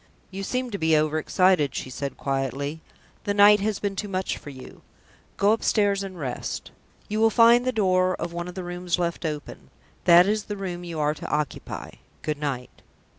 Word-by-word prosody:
"You 195 +1 -5
seem 250 +5 -2
to 200 - -4
be 160 -1 +3
overexcited," 155 0 +2
she 130 - -4
said 140 +1 -5
quietly. 140 +3 -2 0.4
"The 205 - 0
night 205 +1 +7
has 210 0 -1
been 200 -1 -3
too 205 - -3
much 190 -1 -2
for - - -10
you. 130 -2 -11 0.6
Go 200 +1 +4
upstairs, 205 -3 +2
and 190 -2 -6
rest. 130 -4 -4 0.4
You 215 +1 -2
will 225 0 +5
find 235 +2 +5
the 255 - +2
door 185 -5 +2
of 170 +1 -5
one 175 0 -4
of 180 - -8
the 185 - -5
rooms 175 0 -2
left 170 -1 -2
open. 150 -2 -7 0.4
That 175 +1 +8
is 210 +1 0
the 205 - -5
room 180 -3 -5
you 170 -2 -5
are 150 0 +2
to - - -8
occupy. 150 -3 -3 0.3
Good 150 -1 -2
night." 135 -4 -4
180 Hz, 190 wpm, -25 LUFS, 150-205 Hz, 0.6 s, That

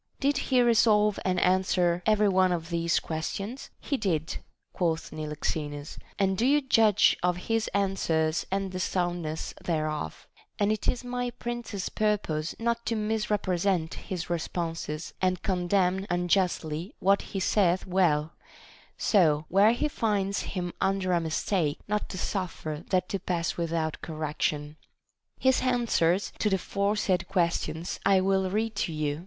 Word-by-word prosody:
Did 285 +1 +2
he 255 -2 +5
resolve 210 -3 +4
and 185 -1 +1
answer 180 -1 +2
every 215 -1 +4
one 185 -1 +3
of 170 -1 -3
these 170 0 +1
ques 160 -1 -3
tions 225 +7 -6
\ - - -45
He 280 - +2
did, 165 -8 -1 0.4
quoth 165 -3 -1
Niloxenus, 150 -1 -4 0.2
and 195 -1 +2
do 220 - -1
you 285 +4 +5
judge 225 -7 +4
of 180 0 +1
his 225 -1 +1
answers 170 -5 0
and 195 0 -1
the 185 - -4
soundness 175 -4 -2
thereof: 155 - -2 0.3
and 205 0 +2
it 215 - -2
is 250 - 0
my 245 0 -2
prince's 240 -5 -5
purpose 195 -8 -1
not 235 0 -1
to 230 - +1
misrepresent 200 -5 0
his 180 -3 -5
responses 165 -2 -3
and 185 -1 +1
condemn 185 +1 +1
unjustly 175 -1 0
what 195 +1 +3
he 195 - -5
saith 185 -2 +2
well, 170 -5 +2 0.6
so, 155 -7 +3
where 200 +5 +5
he 270 +5 0
finds 205 -7 0 0.2
him 175 -1 -2
under 190 -1 +1
a 170 - +2
mistake, 160 -1 0
not 210 0 -1
to 185 - -6
suffer 175 -5 -3
that 185 -1 +1
to 195 - -2
pass 170 -2 -2
without 165 -2 -2
correction. 155 -1 -3 0.6
His 260 0 +3
answers 230 -8 +1
to 210 - +2
the 190 - +2
foresaid 200 -2 0
questions 170 -2 -1
I 195 -1 +5
will 190 0 +1
read 220 +3 -1
to 170 - 0
you. 150 -1 -2
185 Hz, 150 wpm, -28 LUFS, 165-210 Hz, 0.6 s, he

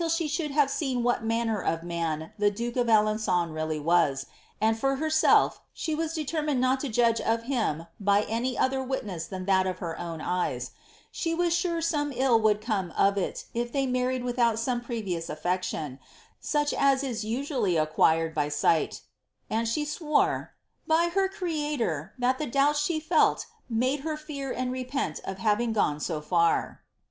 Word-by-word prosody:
tie 335 - -1
should 300 +1 -1
have 280 -1 +2
seen 260 -5 -1
what 245 -2 +1
manner 225 -2 0
of 165 0 -1
man 165 -2 -3
the 205 0 +4
duke 235 +4 -4
of 245 -2 +1
Aleni^nn 215 -6 +2
really 155 0 -2
was; 145 -4 +2 0.3
and 220 +1 +3
for 270 +2 +1
ber$elf, 315 +2 +3
ahe 315 -2 -2
was 325 +1 -2
determined 300 -3 -1
not 255 +1 +2
to 280 - -3
judge 230 0 +2
of 230 +1 0
him 225 - -1
by 200 0 +3
any 240 +4 -2
other 265 +1 +1
wimess 215 -11 -4
than 185 -1 -5
that 190 -1 +3
of 185 -1 -2
her 165 -2 -5
own 165 -2 -5
eyes; 180 +3 -2 0.4
she 330 -1 -2
was 345 0 +1
sure 340 -1 0
some 295 -3 0
ill 255 -3 +4
would 210 -1 +3
come 205 -6 -1
of 200 0 +4
it 195 - -3
if 240 0 -2
they 275 +1 0
mar 250 -1 0
ried 255 -1 -2
without 240 -2 +1
some 240 +1 -1
previous 205 -9 -3
a(ti; 150 - -6 0.2
citon, 150 -7 -5 0.4
such 295 -1 0
as 275 -1 +3
is 240 -5 -3
usually 235 - -1
acquireil 160 +1 +2
by 150 -1 0
sight," 150 +2 +1 0.5
and 230 +1 0
she 295 +7 0
swore, 300 0 0
>' - - -50
by 330 +2 +3
her 390 0 +2
Creator, 295 - -2
that 255 +1 +1
the 305 - -2
doubts 280 +4 +2
she 310 +2 0
lelt 320 - +4 0.2
made 255 +5 +1
her 305 +2 -3
fear 285 -3 -6
and 255 0 -2
repent 255 - -3
of 190 - -4
having 215 +3 +1
gone 150 -9 +1
bo 160 -4 -3
far." 170 +1 +1
235 Hz, 180 wpm, -27 LUFS, 185-280 Hz, 0.5 s, the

